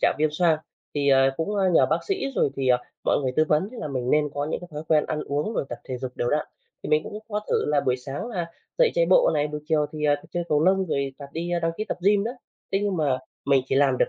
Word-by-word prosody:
trạng - - +3
viêm 155 +1 +3
xoang. 160 0 +2 0.4
Thì, 145 -1 +1
ờ, 135 -1 +5
cũng 160 - -2 0.2
nhờ - - +5
bác - - +1
sĩ 390 -7 0
rồi 165 - +2
thì, 135 -1 0
ờ, 125 -1 +5 0.3
mọi - - +3
người 130 -1 -1
tư 155 - +5
vấn 155 +6 +2
là 235 -11 -5
mình 130 -2 -2
nên 150 0 +3
có 145 0 -1
những - - -2
cái 180 - -10
thói 150 0 -5
quen 155 -1 +4
ăn 150 - -2
uống 145 +9 -1
rồi - - 0
tập 120 - -6
thể 130 - -5
dục 130 0 -5
đều 120 - 0
đặn, 150 0 +1 0.4
thì - - -5
mình 155 0 +3
cũng 210 - -6
có 210 -1 -1
thử - - +2
là 150 -1 +2
buổi 125 0 +1
sáng 135 - -6
là 180 -8 -3 0.3
dậy - - +5
chạy - - +3
bộ - - +5
này, 145 +1 +1
buổi 150 0 -5
chiều 150 -1 +2
thì, 155 -1 -4
ờ, 145 -1 +4 0.2
chơi 175 0 -2
cầu 150 +1 +3
lông 190 +1 +3
rồi 140 -4 -1
tập 140 - -9
đi, 170 +2 -3
a 175 - +1
đăng 165 0 0
ký 215 - -2
tập - - -3
gym 205 0 +4
nữa. 240 +3 -4 0.4
Thế 195 - +3
nhưng 200 -2 0
mà 145 -5 +1 0.3
mình 135 -2 +4
chỉ 135 - -1
làm 135 -2 +3
được - - +3
150 Hz, 290 wpm, -25 LUFS, 140-180 Hz, 0.4 s, ờ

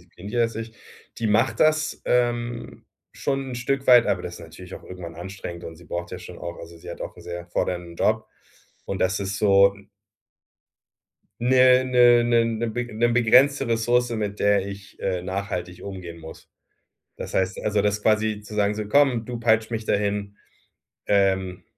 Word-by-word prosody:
disziplinierter 100 +7 -4
als 115 -1 -1
ich. 115 0 -6 0.4
Die 115 - -1
macht 110 +2 +2
das, 155 0 +2
ähm, 120 -1 -1 0.3
schon 135 -1 -2
'n - - -5
Stück 135 +3 -2
weit, 125 -2 +7
aber - - 0
das 85 - -6
ist - - -11
natürlich 90 +3 -11
auch - - -11
irgendwann 90 -3 -9
anstrengend 90 -1 -8
und 80 - -8
sie 85 - -16
braucht 85 +3 -5
ja 90 - -6
schon 90 -1 -11
auch 85 -1 -7
also, 85 0 -11
sie 80 - -10
hat - - -9
auch - - -6
'n - - -13
sehr 85 0 -7
fordernden 85 -1 -3
Job 110 0 +1 0.6
und 95 - -4
das 95 +1 +1
ist 95 0 -3
so 100 -1 +5 1.7
'ne 130 +1 +5
'ne 120 -1 +5
'ne 120 -1 +3
'ne 120 - -1
beg 120 +2 -3
'ne 120 - +3
begrenzte 130 +4 +4
Ressource, 120 +2 +1
mit 105 -3 -3
der 100 -1 +3
ich, 100 0 -10
äh, 90 -2 -2
nachhaltig 90 -1 -5
umgehen 90 -4 -8
muss. 80 0 -12 0.7
Das - - -7
heißt 95 0 0
also 105 -1 +1
das 105 +1 0
quasi 110 -1 +1
zu 105 +1 -10
sagen 105 0 +1
so: 105 -1 -4
„Komm, 130 -1 +3
du 120 0 -6
peitscht 110 -1 +2
mich 110 -1 -4
dahin, 100 0 -1 0.7
ähm.” 95 -2 +1
105 Hz, 180 wpm, -24 LUFS, 95-120 Hz, 1.7 s, weit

